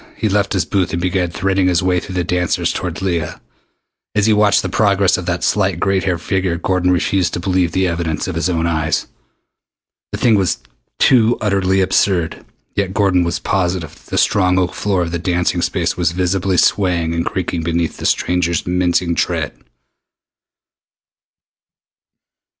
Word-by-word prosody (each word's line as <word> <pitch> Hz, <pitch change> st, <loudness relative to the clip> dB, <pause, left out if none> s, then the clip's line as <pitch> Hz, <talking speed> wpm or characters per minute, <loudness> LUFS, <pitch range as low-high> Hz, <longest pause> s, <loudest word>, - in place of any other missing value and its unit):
He 110 Hz, -, 0 dB
left 100 Hz, -1 st, +1 dB
his 95 Hz, -, 0 dB
booth 95 Hz, -5 st, -1 dB
and 85 Hz, -, -1 dB
began 90 Hz, 0 st, 0 dB
threading 95 Hz, +2 st, 0 dB
his 90 Hz, 0 st, +2 dB
way 90 Hz, -1 st, +2 dB
through 95 Hz, +1 st, -8 dB
the 90 Hz, -, 0 dB
dancers 90 Hz, 0 st, 0 dB
toward 90 Hz, +1 st, -4 dB
Leah. 85 Hz, -5 st, -2 dB, 0.8 s
As 105 Hz, -1 st, +2 dB
he 110 Hz, -, +4 dB
watched 105 Hz, -1 st, +3 dB
the -, -, -1 dB
progress 100 Hz, 0 st, +2 dB
of -, -, -5 dB
that -, -, -1 dB
slight -, -, +1 dB
gray 95 Hz, -1 st, +1 dB
haired 90 Hz, -3 st, -2 dB
figure 95 Hz, -2 st, -1 dB
Gordon 90 Hz, 0 st, 0 dB
refused 90 Hz, 0 st, +1 dB
to -, -, -3 dB
believe 90 Hz, -1 st, 0 dB
the 95 Hz, +2 st, +1 dB
evidence 85 Hz, -3 st, -2 dB
of -, -, -3 dB
his 85 Hz, -, -1 dB
own 85 Hz, -2 st, 0 dB
eyes. 80 Hz, -2 st, 0 dB, 1.1 s
The -, -, -3 dB
thing 115 Hz, -, +3 dB
was 95 Hz, -4 st, +2 dB, 0.4 s
too 120 Hz, -3 st, +4 dB
utterly 95 Hz, -2 st, +1 dB
absurd 90 Hz, -3 st, +1 dB, 0.3 s
yet 100 Hz, -1 st, -2 dB
Gordon 95 Hz, -4 st, +3 dB
was 85 Hz, 0 st, -1 dB
positive 90 Hz, -4 st, -1 dB
that -, -, -20 dB
the -, -, -2 dB
strong 90 Hz, -3 st, +2 dB
oak 90 Hz, -1 st, 0 dB
floor 95 Hz, -3 st, 0 dB
of 85 Hz, -, -4 dB
the 85 Hz, -, -2 dB
dancing 90 Hz, 0 st, 0 dB
space 85 Hz, -1 st, -1 dB
was 85 Hz, -2 st, 0 dB
visibly 90 Hz, +1 st, 0 dB
swaying 85 Hz, -5 st, +2 dB
and 85 Hz, 0 st, -1 dB
creaking 90 Hz, -2 st, -3 dB
beneath 85 Hz, 0 st, -1 dB
the -, -, -2 dB
stranger's 85 Hz, -2 st, 0 dB
mincing 90 Hz, -1 st, +1 dB
tread! -, -, -1 dB
90 Hz, 170 wpm, -17 LUFS, 85-95 Hz, 1.1 s, he